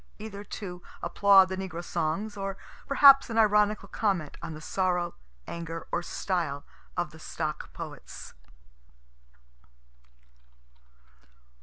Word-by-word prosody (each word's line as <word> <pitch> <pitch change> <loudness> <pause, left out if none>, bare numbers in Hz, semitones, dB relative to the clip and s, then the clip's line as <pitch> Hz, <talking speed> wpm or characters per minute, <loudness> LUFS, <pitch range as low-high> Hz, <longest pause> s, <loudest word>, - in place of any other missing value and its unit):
Either 205 -1 -7
to 180 -3 -7 0.2
applaud 195 -2 +6
the 190 - -3
negro 180 -3 -5
songs 175 +6 -2
or 195 -1 -4 0.3
perhaps 275 -1 +7
an 225 - -3
ironical 210 -1 +3
comment 190 -9 -1
on 160 - -6
the - - -8
sorrow, 180 +1 0 0.3
anger, 165 -1 -6
or 170 - 0
style 170 -6 -2 0.3
of - - -1
the - - -14
stock - - -4
poets. - - -9
190 Hz, 110 wpm, -28 LUFS, 170-210 Hz, 0.3 s, perhaps